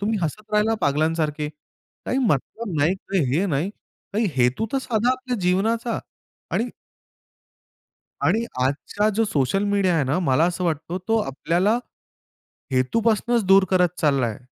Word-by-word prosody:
तुम्ही 215 +2 0
हसत 210 +7 -4
राहिला 210 +1 +3
पागलांसारखे. 150 +1 0 0.6
काही 260 - 0
मतलब 210 - -1
नाही, 165 +6 +3
काही 190 -1 -2
हे 180 - +2
नाही. 165 +4 -1 0.4
काही 220 +1 +2
हेतू 125 - +2
तर 270 - +2
साधा 240 -1 +1
आपल्या 255 -1 -2
जीवनाचा 220 +6 +1 0.6
आणि 235 +3 +1 1.5
आणि 225 +2 +2 0.2
आजचा 155 +10 0
जो 225 - +3
सोशल 195 +3 0
मीडिया 195 -3 +2
आहे 155 -4 +2
ना 135 +6 0
मला 130 +5 +4
असं 180 +1 -1
वाटतो 165 +2 -2
तो 225 - +3
आपल्याला 180 - +1 0.9
हेतूपासूनच 225 - +1
दूर 195 0 +6
करत 180 -2 +4
चाललाय. 135 -8 +1
190 Hz, 135 wpm, -23 LUFS, 150-225 Hz, 1.5 s, दूर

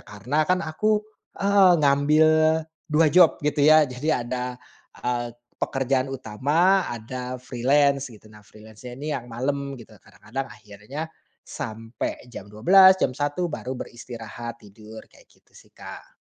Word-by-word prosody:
karena 130 - -2
kan 185 -1 +1
aku, 210 +7 0 0.3
heeh, 200 -2 +5
ngambil 150 +2 +4 0.6
2 155 +1 +3
job 175 -2 +6
gitu 150 0 0
ya 155 +1 +6
jadi 130 0 -2
ada, 125 +1 -4 0.5
eee, 120 -1 -2 0.2
pekerjaan 135 0 0
utama 145 - +1
ada 125 +2 -6
freelance 140 +3 +1
gitu 110 -2 -16
nah 105 - -15
freelance-nya 110 +4 -13
ini 150 +3 -4
yang 125 -4 -5
malem 140 +3 -3
gitu 115 -2 -14
kadang-kadang 135 +6 -7
akhirnya, 105 +7 -8 0.4
sampai 115 -4 -6
jam 100 - -9
12 185 - +6
jam 140 - 0
1 145 +6 -2
baru 130 -3 -5
beristirahat 120 -1 -8
tidur 110 +2 -13
kayak - - -21
gitu - - -30
sih, - - -19
Kak. - - -11
130 Hz, 135 wpm, -24 LUFS, 115-150 Hz, 0.6 s, job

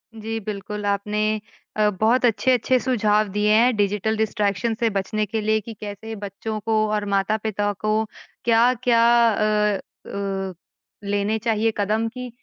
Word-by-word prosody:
जी, 225 +1 -4
बिल्कुल 210 0 -5
आपने 210 +2 0 0.4
अ, 210 -1 +4
बहुत 235 +4 +3
अच्छे-अच्छे 250 +2 +2
सुझाव 215 -4 +2
दिए 210 +1 +2
हैं 235 +3 +4
डिजिटल 210 +1 +1
डिस्ट्रैक्शन 210 0 0
से 230 - +2
बचने 205 +1 -1
के 220 +2 -3
लिए 215 +1 +2
कि 225 +2 -8
कैसे 210 +2 -6
बच्चों 205 +2 -5
को 225 - 0 0.2
और 210 -1 -1
माता-पिता 205 +1 0
को 215 - 0 0.5
क्या-क्या 240 0 +3 0.3
अ 210 -1 +1 0.3
अ, 195 -1 -3 0.5
लेने 205 +2 0
चाहिए 225 0 +1
कदम 215 +2 0
की 250 -1 -6
215 Hz, 140 wpm, -23 LUFS, 205-225 Hz, 0.5 s, अ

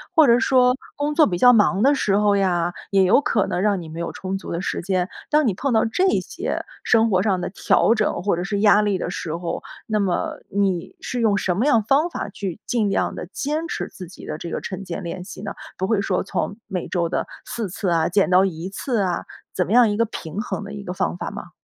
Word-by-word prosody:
或 320 -2 +7
者 235 -2 +5
说 250 -1 +4 0.2
工 290 +1 -1
作 310 0 +5
比 175 - -1
较 245 +7 +7
忙 205 -2 +3
的 280 +2 +5
时 205 -8 +1
候 205 -1 +3
呀， 175 -3 +1 0.2
也 195 -1 +4
有 190 +9 +5
可 210 -8 +1
能 180 - -2
让 205 -1 +2
你 - - -9
没 160 +1 -7
有 170 - -3
充 190 0 -4
足 - - -8
的 170 - -2
时 - - -2
间， 185 0 -1 0.2
当 300 0 +3
你 210 - +2
碰 260 +7 -1
到 220 - +3
这 360 +12 +1
些 - - -4 0.2
生 225 -1 +4
活 185 -1 +3
上 195 -2 +1
的 - - -3
调 225 - +3
整 215 -5 -1
或 200 -2 +2
者 175 - -3
是 200 +2 -2
压 210 0 +6
力 205 -2 +1
的 175 - -3
时 165 -3 -4
候， 170 -1 -4 0.2
那 215 -1 0
么 190 -3 -1
你 195 -3 -1
是 250 - -3
用 210 -3 +3
什 185 -3 0
么 220 +8 +1
样 235 -7 +4
方 285 +9 +2
法， 310 - -5
去 195 -2 -5
尽 225 -4 +1
量 195 - 0
地 - - -6
坚 305 +7 -2
持 - - -3
自 180 - -10
己 185 - -12
的 - - -4
这 170 - -6
个 - - -3
晨 190 -1 -5
间 180 +2 -5
练 180 +1 -5
习 185 - -9
呢？ - - -4 0.2
不 190 - -1
会 210 0 +1
说 190 -2 0
从 200 +1 -3
每 185 -4 -4
周 170 -2 -1
的 - - -2 0.2
4 225 -4 -4
次 195 +1 -2
啊， 165 -1 +2
减 195 +1 +2
到 185 +1 +6
1 180 -1 -3
次 225 +3 -2
啊， 180 -2 -2 0.3
怎 180 - 0
么 - - -5
样 240 0 +6
一 - - -1
个 230 - +3
平 195 -3 -5
衡 215 - -4
的 200 +1 -8
一 205 -1 -7
个 180 - -5
方 85 - -1
法 - - -4
吗？ - - -9
200 Hz, 270 characters per minute, -22 LUFS, 180-225 Hz, 0.3 s, 或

